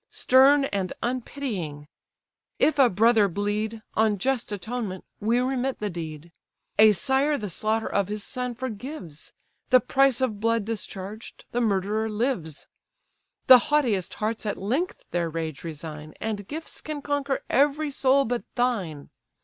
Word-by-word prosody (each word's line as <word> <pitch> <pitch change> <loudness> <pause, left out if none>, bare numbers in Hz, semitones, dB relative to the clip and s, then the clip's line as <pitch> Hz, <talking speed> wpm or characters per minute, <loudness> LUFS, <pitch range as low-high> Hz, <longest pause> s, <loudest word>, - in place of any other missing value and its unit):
Stern 275 +2 +5
and 195 -7 -2
unpitying! 225 - -4 0.7
if 310 - +2
a 260 -3 +7
brother 220 +1 +4
bleed, 210 +3 -2
On 215 -1 +2
just 255 +2 -1
atonement, 205 -1 -4
we 225 +3 +1
remit 260 +1 0
the 210 -1 -3
deed; 160 -1 -7 0.5
A 215 0 +8
sire 270 +9 +1
the 210 -6 -5
slaughter 220 +5 -1
of 200 -2 0
his 210 0 -3
son 250 0 -2
forgives; 240 - -7 0.4
The 255 - +7
price 270 0 +2
of 240 -6 -1
blood 230 -1 +1
discharged, 210 0 -7
the 245 - 0
murderer 215 +1 0
lives: 210 - -2 0.8
The 255 -1 +10
haughtiest 245 - +1
hearts 220 +1 -2
at 205 - -2
length 260 - -2
their 170 -1 0
rage 160 -2 -4
resign, 155 -1 -7
And 210 -3 -4
gifts 315 +5 -7
can 300 -2 -6
conquer 285 -2 -1
every 290 +2 +2
soul 275 0 +3
but 240 +1 -2
thine. 195 - -1
220 Hz, 140 wpm, -26 LUFS, 195-260 Hz, 0.8 s, The